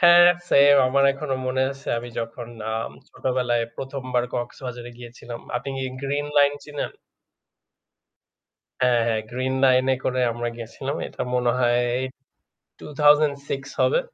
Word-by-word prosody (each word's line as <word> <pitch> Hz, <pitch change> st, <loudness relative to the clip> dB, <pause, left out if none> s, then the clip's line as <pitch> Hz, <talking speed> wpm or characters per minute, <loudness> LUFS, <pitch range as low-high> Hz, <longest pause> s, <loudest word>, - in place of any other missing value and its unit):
হ্যাঁ, 175 Hz, 0 st, +8 dB, 0.2 s
সেইম 140 Hz, 0 st, +7 dB
আমার 140 Hz, +1 st, +3 dB
এখনো 135 Hz, -1 st, -3 dB
মনে 130 Hz, +1 st, +1 dB
আছে 135 Hz, 0 st, -9 dB
আমি 120 Hz, -, -7 dB
যখন 115 Hz, +1 st, -6 dB, 0.2 s
আম 110 Hz, +1 st, -3 dB, 0.2 s
ছোটবেলায় 125 Hz, -2 st, 0 dB
১ম 135 Hz, 0 st, -5 dB
বার 120 Hz, 0 st, +3 dB
কক্সবাজারে 120 Hz, 0 st, -5 dB
গিয়েছিলাম। 120 Hz, 0 st, -9 dB, 0.2 s
আপনি 130 Hz, -, -5 dB
কি 130 Hz, -, -2 dB, 0.2 s
গ্রিন 145 Hz, +1 st, -1 dB
লাইন 145 Hz, 0 st, +5 dB
চিনেন? 145 Hz, -1 st, -4 dB, 1.9 s
হ্যাঁ, 125 Hz, -2 st, +4 dB
হ্যাঁ, 110 Hz, -1 st, +1 dB
গ্রিন 130 Hz, +1 st, -1 dB
লাইন 130 Hz, -1 st, +5 dB
এ -, -, 0 dB
করে 130 Hz, 0 st, 0 dB
আমরা 120 Hz, +1 st, -3 dB
গেছিলাম। 125 Hz, +4 st, -5 dB
এটা -, -, -7 dB
মনে 125 Hz, -1 st, +2 dB
হয় 120 Hz, 0 st, +3 dB, 1.0 s
2006 145 Hz, -1 st, +2 dB, 0.2 s
হবে। 485 Hz, -, +4 dB
130 Hz, 135 wpm, -24 LUFS, 120-140 Hz, 1.9 s, হ্যাঁ